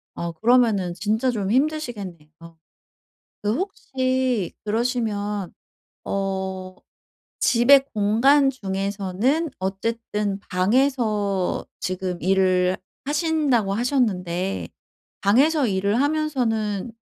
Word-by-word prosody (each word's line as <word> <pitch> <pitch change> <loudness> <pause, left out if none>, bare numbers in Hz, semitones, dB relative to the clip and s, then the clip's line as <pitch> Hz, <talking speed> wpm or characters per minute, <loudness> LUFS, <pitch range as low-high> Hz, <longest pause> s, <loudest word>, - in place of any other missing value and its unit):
어 170 0 -4
그러면은 220 -3 +2
진짜 220 +7 0
좀 205 -5 -2
힘드시겠네요. 235 - -2 1.1
그 210 +1 +1
혹시 260 - -1
그러시면 210 -4 -1 0.5
어 190 -1 -3 0.6
집의 265 +3 +5
공간 235 +7 +4
중에서는 200 - -1
어쨌든 205 +1 -2
방에서 210 -2 +1
지금 185 -1 -3
일을 185 -1 +2 0.3
하신다고 290 - +1
하셨는데 195 -7 -1 0.5
방에서 275 +8 +3
일을 200 +4 +1
하면서는 245 -9 -1
215 Hz, 200 characters per minute, -23 LUFS, 190-260 Hz, 1.1 s, 집의